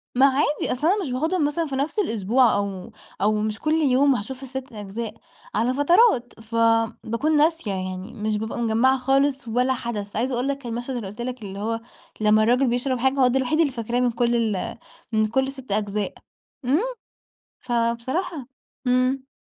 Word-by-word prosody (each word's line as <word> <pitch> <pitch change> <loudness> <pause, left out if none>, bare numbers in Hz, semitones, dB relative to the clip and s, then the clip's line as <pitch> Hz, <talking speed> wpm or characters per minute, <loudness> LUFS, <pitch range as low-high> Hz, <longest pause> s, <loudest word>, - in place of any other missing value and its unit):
ما 265 - +6
عادي. 285 +2 +1
أصل 275 +6 0
أنا 400 +3 +3
مش 280 - -4
باخدهم 315 +5 +1
مثلًا 325 +3 0
في 275 - -4
نفس 285 +10 -1
الأسبوع 230 - +3
أو 200 -2 -3 0.3
أو 210 +2 +3
مش 215 0 -2
كل 310 0 0
يوم 280 -3 +4
هاشوف 255 +6 -5
ال6 265 0 -6
أجزاء، 210 +2 -5 0.4
على 235 +4 +2
فترات. 290 - +4
فباكون 230 +5 +1
ناسية 315 -7 +2
يعني، 185 +2 -4
مش 215 0 -1
بابقى 220 +2 -4
مجمعة 235 +3 +3
خالص 270 0 +1
ولا 250 +3 +2
حدث، 215 -4 -5
عايزة 250 +4 0
أقول 245 +2 -1
لك 280 -2 -3
المشهد 240 +3 -4
اللي 230 -5 -4
قُلت 210 +5 -8
لك 250 0 -4
اللي 195 0 -6
هو 225 +2 -2 0.4
لمّا 215 0 +5
الراجل 250 +4 +3
بيشرب 245 +1 0
حاجة، 265 +2 +2
هو 255 - +6
ده 255 +2 +2
الوحيد 265 +5 0
اللي 300 -5 +3
فاكراه 235 0 -2
من 245 -1 +2
كل 240 0 +1 0.2
ال 185 - -4 0.4
من 215 0 +3
كل 265 +5 +1
ال6 265 -5 -8
أجزاء. 205 0 -1 0.5
امم، 275 +6 +3 0.8
فبصراحة 245 +6 -1 0.4
امم. 255 +2 +1
245 Hz, 175 wpm, -24 LUFS, 220-270 Hz, 0.8 s, ما